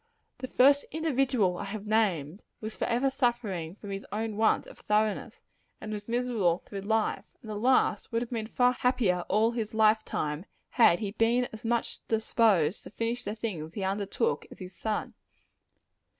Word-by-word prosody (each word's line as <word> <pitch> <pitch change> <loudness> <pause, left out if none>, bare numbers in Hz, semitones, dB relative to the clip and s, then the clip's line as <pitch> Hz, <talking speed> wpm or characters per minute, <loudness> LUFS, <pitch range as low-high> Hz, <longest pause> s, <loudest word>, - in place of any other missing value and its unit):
The 260 - -4
first 280 +3 +5
individual 265 - +1
I - - -4
have 205 +1 -6
named, 200 -6 0 0.2
was 215 0 -6
forever 250 +3 +1
suffering 220 - -1
from 205 -1 -9
his 195 0 -4
own 220 0 -2
want 220 +1 +2
of - - -13
thoroughness 210 0 -1 0.4
and 215 0 -6
was 205 -1 -6
miserable 230 -8 +1
through 200 -1 -6
life; 220 +2 -1
and 220 - -7
the - - -4
last 220 -2 +2
would 230 +1 0
have 240 - -10
been 225 -2 -3
far 245 +2 +3
happier 235 -8 +1
all 220 +3 +3
his 225 -2 -4
life 215 0 +4
time, 150 +5 -3 0.2
had 225 -7 +5
he 205 -2 -2
been 235 +3 +2
as 220 - -9
much 235 0 -1
disposed 215 -6 +2
to - - -10
finish 230 +1 -3
the 205 +2 -3
things 175 -8 -5
he 200 - -3
undertook, 200 - -1
as - - -12
his 185 -1 -9
son. 215 +4 -3
220 Hz, 175 wpm, -29 LUFS, 200-235 Hz, 0.4 s, first